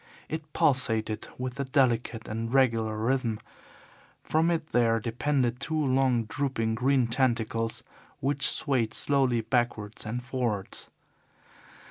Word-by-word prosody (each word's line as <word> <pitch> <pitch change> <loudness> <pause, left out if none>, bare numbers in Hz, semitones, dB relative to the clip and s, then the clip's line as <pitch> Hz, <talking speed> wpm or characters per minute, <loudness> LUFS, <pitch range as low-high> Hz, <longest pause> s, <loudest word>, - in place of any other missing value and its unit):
It 155 -1 -6
pulsated 115 -7 +1
with 130 +1 -5
a - - +1
delicate 125 -4 +1
and 115 +1 -4
regular 115 -5 +2
rhythm. 115 -1 0 0.8
From 160 +2 +2
it 165 -2 -2
there 115 -2 +3
depended 125 +2 0
two 160 +3 -3
long, 130 -4 +2
drooping, 115 -1 -2
green 130 +2 +2
tentacles, 115 -2 0 0.4
which 135 -2 +3
swayed 120 -3 +1
slowly 130 -5 +2
backwards 115 -2 -1
and 120 +3 -4
forwards. 120 -6 -3
125 Hz, 115 wpm, -28 LUFS, 115-135 Hz, 0.8 s, there